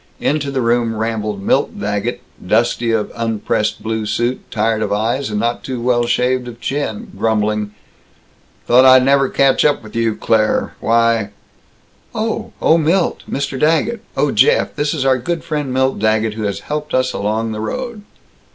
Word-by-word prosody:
Into 145 -1 0
the 135 -1 -1
room 115 -1 +1
rambled 110 -3 -3
Milt - - +1
Daggett, - - -2 0.2
dusty 115 +4 +1
of 110 -2 0
unpressed 110 -2 -1
blue 110 -1 -2
suit, 120 +4 -1
tired 110 0 0
of - - -1
eyes, 115 +6 0
and 105 -1 -2
not 120 +2 -1
too 130 -2 -4
well 120 0 +1
shaved 125 +1 +1
of 120 -1 -9
chin, 130 -3 -3
grumbling, 105 -1 0 0.9
"Thought 125 +2 +5
I'd 130 -1 +7
never 135 -1 +3
catch 135 -1 +3
up 145 -5 +2
with 110 0 -12
you, 115 -2 +1
Claire 110 -1 +1
Why 115 -2 +2 0.4
" - - -32
"Oh! 225 0 -2
Oh, 165 - +4
Milt 165 +4 +1
Mr. 140 -1 -3
Daggett 165 - +1 0.2
Oh, - - +2
Jeff, 475 +2 +3
this 145 +1 -1
is 135 -3 -2
our 130 -1 +3
good 165 +6 -3
friend 150 -4 -3
Milt 130 -1 +1
Daggett, 110 0 +1
who 110 -1 -4
has 100 -1 -3
helped 150 -1 -4
us 130 0 +1
along 110 +2 -1
the 110 0 -4
road." 235 - -4
120 Hz, 170 wpm, -17 LUFS, 110-140 Hz, 0.9 s, I'd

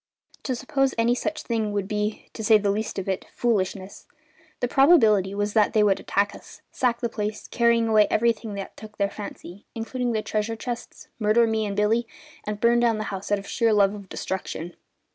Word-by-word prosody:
To 260 - -1
suppose 270 +2 0
any 230 +1 +3
such 310 +5 -3
thing 220 -3 -1
would 200 -2 -1
be 210 0 -2
to 220 - -6
say 215 0 +6
the 205 -1 0
least 215 +2 -3
of 195 - -4
it 190 -1 -2
foolishness. 195 -4 -2 0.5
The 245 - 0
probability 225 - +4
was 205 0 -1
that 215 -2 +3
they 215 - +4
would 200 -2 +3
attack 200 +1 0
us, - - -14
sack 240 -2 0
the 235 - +1
place, 215 -1 -4
carrying 235 -1 +2
away 215 -2 +5
everything 225 -2 0
that 195 -1 -7
took 215 0 -12
their 200 -1 0
fancy, 200 -2 -9
including 240 +2 -2
the 215 -1 -1
treasure 215 +1 -2
chests, 240 +1 -7
murder 215 +2 +3
Billy 220 -1 0
and 200 0 -4
me, 230 +2 +1 0.4
and 210 0 -4
burn 235 +2 +4
down 235 -2 +2
the 215 - -2
house 195 +1 -6
out 205 - +4
of 200 - -8
sheer 230 -1 +1
love 200 -1 +4
of 200 -2 -10
destruction. 175 -2 -5
215 Hz, 200 wpm, -25 LUFS, 205-235 Hz, 0.5 s, say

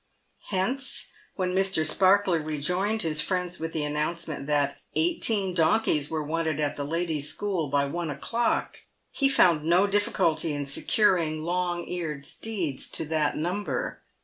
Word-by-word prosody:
Hence, 250 +8 -1 0.3
when 180 -2 -1
Mr. 190 -4 +2
Sparkler 185 +1 +3
rejoined 180 +8 -1
his 155 -2 +1
friends 180 +2 -2
with 165 +1 -3
the 155 -2 -2
announcement 150 0 -3
that 145 -1 +1 0.2
eighteen 225 - +2
donkeys 160 -3 +2
were 160 -1 -2
wanted 160 0 -1
at 150 -1 0
the 145 - -3
ladies' 155 -1 -1
school 180 -4 -2
by 140 0 +2
one 170 +3 -3
o'clock, 230 +11 -1 0.3
he 275 -1 +2
found 170 - +4
no 175 +4 +4
difficulty 195 -6 +1
in 145 -1 -3
securing 155 +1 +1
long 175 0 -1
eared 155 -6 -4
steeds 175 -6 -3
to 160 - -2
that 155 -2 +1
number. 180 +6 -2
165 Hz, 145 wpm, -27 LUFS, 150-190 Hz, 0.3 s, found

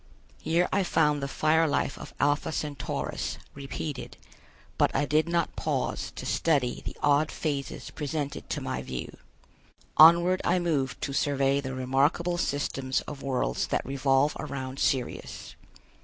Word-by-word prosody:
Here 170 +2 +2
I 200 - +3
found 150 -5 +2
the 140 - -2
fire 160 +3 +2
life 145 -1 0
of - - -9
Alpha 145 +2 +1
Centaurus 145 -4 -3 0.2
repeated, 140 0 -6 0.6
but - - +5
I - - +2
did 155 +3 +2
not 170 0 0
pause - - -2
to - - -6
study 140 -7 +1
the - - -6
odd 145 +1 +4
phases 140 -3 -3
presented 145 -1 -4
to - - -2
my 65 - -3
view. 65 -1 -6 0.8
Onward 170 +4 +7
I 175 - +2
moved 155 -7 -1
to 140 - -2
survey 140 0 +2
the 130 -1 -5
remarkable 140 +7 +1
systems 135 -3 -1
of 145 -2 -8
worlds 125 - -1
that - - -1
revolve 135 +2 +2
around 135 -3 -5
Sirius. 130 -3 -2
145 Hz, 140 wpm, -28 LUFS, 135-160 Hz, 0.8 s, Onward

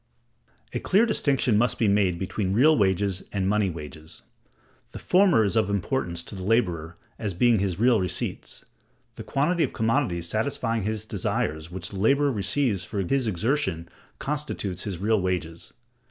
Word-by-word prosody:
A - - -1
clear 205 +5 +3
distinction 135 - +1
must 120 +2 +1
be 110 - +2
made 100 -3 +2
between 95 +1 -2
real 150 +9 +5
wages 95 -3 +1
and 95 -2 -1
money 105 -1 +2
wages; 80 -1 -9 0.7
the - - -7
former 180 - +4
is 100 +1 0
of 110 -3 +2
importance 95 -4 -2
to - - -8
the 95 -2 -6
laborer 90 -7 0 0.2
as 100 -5 -3
being 120 +2 +4
his 95 -3 -1
real 120 -1 +4
receipts. 90 - -3 0.5
The - - -8
quantity 160 +5 +1
of - - -2
commodities 110 -7 0
satisfying 115 +1 -1
his 110 0 -3
desires 80 -6 -2
which 90 0 -4
the 100 - -7
laborer 140 +7 +3
receives 110 -1 0
for 105 - -4
his 130 +6 0
exertion 95 - -1 0.3
constitutes 135 - -3
his 100 -4 -3
real 105 +3 +1
wages. 85 -3 -3
105 Hz, 160 wpm, -25 LUFS, 90-125 Hz, 0.7 s, real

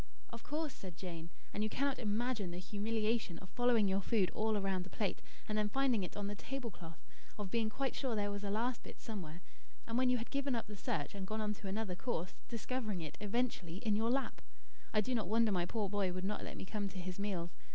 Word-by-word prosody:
"Of 230 -1 -6
course," 305 -1 -1
said 180 -4 -8
Jane. 170 -2 -5 0.2
"And 210 - 0
you 215 - +2
cannot 275 +4 +1
imagine 220 -2 +1
the 175 - -4
humiliation 215 0 +1
of 185 - -11
following 245 -4 +5
your 195 +1 +3
food 195 -2 +3
all 220 -1 +2
round 195 -2 +1
the 185 - -9
plate, 200 -2 -1 0.3
and 215 - 0
then 210 -1 +3
finding 260 -2 +3
it 180 - -4
on 205 - -1
the 205 - -1
table 250 +2 -4
cloth; 165 -3 -10 0.3
of 205 -3 -3
being 225 -2 +3
quite 270 +4 0
sure 255 -5 0
there 205 -1 +1
was 205 0 -3
a 200 - 0
last 230 +4 +1
bit - - -10
somewhere, 180 -6 -5 0.4
and 230 +2 +1
when 255 -1 +5
you 250 - +5
had 230 - -5
given 275 -2 +2
up 230 - -1
the 210 -1 -7
search 145 -6 -1
and 195 -1 -4
gone 215 +2 -1
on 210 -1 +1
to 205 -1 -7
another 200 -1 0
course, 180 -3 -1 0.2
discovering 230 -4 -1
it, 155 -3 -5
eventually, 210 -5 0
in 215 0 +2
your 225 +2 +3
lap. 270 +2 +1 0.5
I 215 - +5
do 255 +5 0
not 220 -6 +2
wonder 225 0 +5
my 175 -2 +2
poor 215 -1 0
boy 195 -2 +2
would 185 +1 -2
not 210 +1 -1
let - - -5
me - - -4
come 205 0 -1
to 190 - -6
his 185 +1 -4
meals. 185 -4 -1
210 Hz, 240 wpm, -38 LUFS, 190-230 Hz, 0.5 s, following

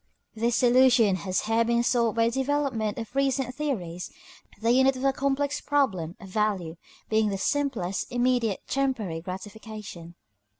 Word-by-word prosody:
This 230 +2 0
solution 245 -4 +5
has 185 +1 -1
here 225 +1 +2
been 235 +1 +1
sought 235 -2 +1
by 230 - +3
a 230 - +2
development 265 -5 -1
of 230 +2 -7
recent 270 -2 0
theories, 185 - -3 0.5
the 230 +2 +2
unit 265 +2 +4
of 255 - -6
the 275 0 +3
complex 280 +1 -1
problem 195 - 0
of 195 - -11
value 190 -5 -1 0.3
being 220 -1 +2
the 195 - -2
simplest, 230 -6 -1
immediate, 245 -4 +1
temporary 245 -12 -1
gratification. 190 -2 -8
230 Hz, 145 wpm, -26 LUFS, 195-265 Hz, 0.5 s, solution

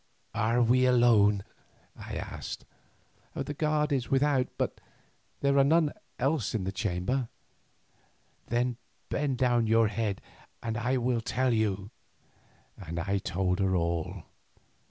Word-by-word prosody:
"Are 115 +3 +2
we 130 +2 +4
alone?" 110 -5 +4 0.5
I - - -7
asked. - - -6 0.7
"The 145 - -3
guard 150 0 +1
is 130 -4 0
without, 135 -1 +2
but - - -2 0.6
there 140 0 +3
are - - +7
none 155 +1 +3 0.2
else 135 -4 0
in 105 - -1
the 95 - -2
chamber." 105 +5 -1 1.2
"Then 120 0 0 0.3
bend 140 -3 0
down 120 -3 +2
your 115 0 +4
head 105 -2 -2 0.4
and 115 -1 -2
I 125 +3 0
will 120 -1 0
tell 125 +2 +1
you," 100 -2 0 0.8
and 85 -3 -7
I 100 +4 0
told 95 0 -1
her 95 -1 +2
all. 85 -1 -1
120 Hz, 130 wpm, -29 LUFS, 100-130 Hz, 1.2 s, are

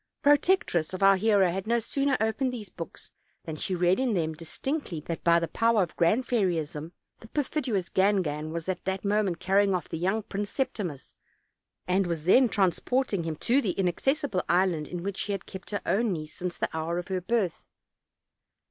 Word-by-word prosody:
The 285 - +6
protectress 285 - +2
of 185 - -3
our 195 0 +7
hero 195 -2 +3
had 190 +3 -4
no 235 +1 +3
sooner 275 +3 0
opened 220 +4 0
these 215 -6 -7
books 165 - -8 0.3
than 160 - -5
she 185 +4 -2
read 180 +3 +3
in 255 -5 +1
them 160 -3 0
distinctly 170 - -4
that 165 +2 -5
by 170 0 +5
the 170 - -2
power 230 0 +2
of 170 - -7
Grand 215 +10 +2
Fairyism 165 - -1 0.3
the 225 - -13
perfidious 250 - -1
Gangan 180 -6 +1
was 165 +1 -4
at 185 -1 -2
that 190 +1 -2
moment 200 -4 +1
carrying 195 0 +3
off 180 - -4
the 165 - -4
young 195 +5 0
Prince 205 0 -4
Septi 230 -7 -1
mus, 145 -5 -10 0.7
and 185 +1 +2
was 165 -3 -3
then 245 +8 +5
transporting 200 +1 +1
him 160 -1 -2
to 250 - +2
the 195 -8 -1
inaccessible 200 - 0
island 175 -4 +2
in 175 -1 -5
which 195 0 -3
she 205 - -2
had 195 - -5
kept 190 -1 -9
her 205 -3 -3
own 215 0 +1
niece 155 -2 -6
since 180 0 -5
the - - -2
hour 160 +2 -2
of 175 +1 -5
her 185 -1 -1
birth. 195 -3 -1
190 Hz, 195 wpm, -28 LUFS, 170-220 Hz, 0.7 s, our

